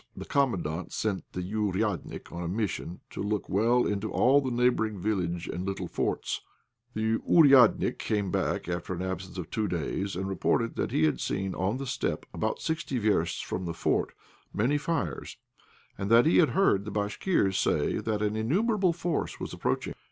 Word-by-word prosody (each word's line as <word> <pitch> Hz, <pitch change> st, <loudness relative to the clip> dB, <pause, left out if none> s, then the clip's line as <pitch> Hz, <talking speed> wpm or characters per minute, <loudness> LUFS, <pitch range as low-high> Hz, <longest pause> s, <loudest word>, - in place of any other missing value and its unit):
The -, -, -6 dB
Commandant 90 Hz, -, 0 dB
sent 105 Hz, -4 st, -2 dB
the 90 Hz, -, -3 dB
"ouriadnik" 100 Hz, -1 st, -2 dB
on 85 Hz, -, -5 dB
a 85 Hz, -, -3 dB
mission 95 Hz, -2 st, -3 dB
to -, -, -5 dB
look 105 Hz, 0 st, -1 dB
well 115 Hz, +5 st, +3 dB
into 105 Hz, +1 st, -2 dB
all 135 Hz, +3 st, +5 dB
in 125 Hz, -, -2 dB
the 125 Hz, -, +2 dB
neighbouring 110 Hz, -4 st, +2 dB
village 90 Hz, -4 st, -1 dB
and 90 Hz, -, -4 dB
little 95 Hz, 0 st, -3 dB
forts. -, -, -2 dB, 0.5 s
The 110 Hz, +1 st, +1 dB
"ouriadnik" 135 Hz, -8 st, +5 dB
came 100 Hz, -3 st, -1 dB
back -, -, -1 dB
after 90 Hz, +1 st, -3 dB
an 90 Hz, -, -4 dB
absence 95 Hz, 0 st, -5 dB
of 90 Hz, -4 st, -6 dB
two 110 Hz, -1 st, 0 dB
days, 95 Hz, +3 st, -2 dB
and 95 Hz, +2 st, -3 dB
reported 115 Hz, +4 st, 0 dB
that -, -, -1 dB
he -, -, +1 dB
had 75 Hz, -, +2 dB
seen 95 Hz, 0 st, -2 dB
in 100 Hz, +6 st, 0 dB
the 135 Hz, -, -5 dB
steppe, 125 Hz, -, -2 dB
about -, -, -2 dB
sixty 160 Hz, -4 st, -2 dB
versts 105 Hz, -7 st, +1 dB
from 95 Hz, -, -4 dB
the 85 Hz, -1 st, -4 dB
fort, -, -, 0 dB, 0.4 s
many 135 Hz, +8 st, +1 dB
fires, 165 Hz, +2 st, -3 dB, 0.6 s
and 100 Hz, 0 st, -2 dB
that 115 Hz, +3 st, +6 dB
he 160 Hz, -, +4 dB
had 160 Hz, -, +5 dB
heard 100 Hz, -, +4 dB
the -, -, -4 dB
Bashkirs 105 Hz, -, 0 dB
say -, -, +1 dB
that 105 Hz, -1 st, -1 dB
an 105 Hz, 0 st, 0 dB
innumerable 185 Hz, -, +2 dB
force 170 Hz, -1 st, -2 dB
was -, -, -5 dB
approaching. -, -, -1 dB
105 Hz, 180 wpm, -28 LUFS, 95-125 Hz, 0.6 s, that